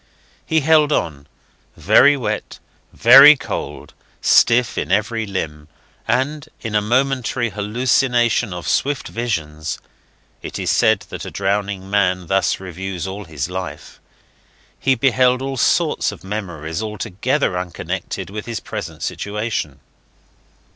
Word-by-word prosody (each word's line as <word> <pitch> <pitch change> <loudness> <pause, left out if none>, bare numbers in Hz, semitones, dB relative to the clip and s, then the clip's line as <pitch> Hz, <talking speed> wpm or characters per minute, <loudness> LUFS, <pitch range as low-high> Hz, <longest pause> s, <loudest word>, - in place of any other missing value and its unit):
He 160 -1 +2
held 155 0 +4
on 70 - -2 0.5
very 145 +1 +5
wet, 105 -4 -4 0.3
very 135 +6 +9
cold, 130 - -6 0.3
stiff 120 0 +4
in - - -3
every 110 +1 0
limb; 75 -6 -5 0.4
and 135 +5 -1
in 110 - -6
a 105 - +3
momentary 125 0 0
hallucination 120 +1 +1
of 90 -1 -6
swift 140 0 0
visions 80 -10 -3 0.6
(it - - -6
is - - -1
said - - +3
that - - -6
a - - -5
drowning 100 -1 -2
man 90 -3 +1
thus 95 +1 +1
reviews 95 0 -6
all 100 +2 -6
his 80 -3 -4
life) 90 0 -7 0.8
he 135 -1 +2
beheld 125 0 +3
all 135 0 -4
sorts 125 - +1
of - - -12
memories 90 -5 -5
altogether 105 +3 -2
unconnected 90 +1 -5
with 105 +2 -6
his 115 -3 -3
present - - -7
situation. 105 - -4
105 Hz, 125 wpm, -19 LUFS, 95-125 Hz, 0.8 s, very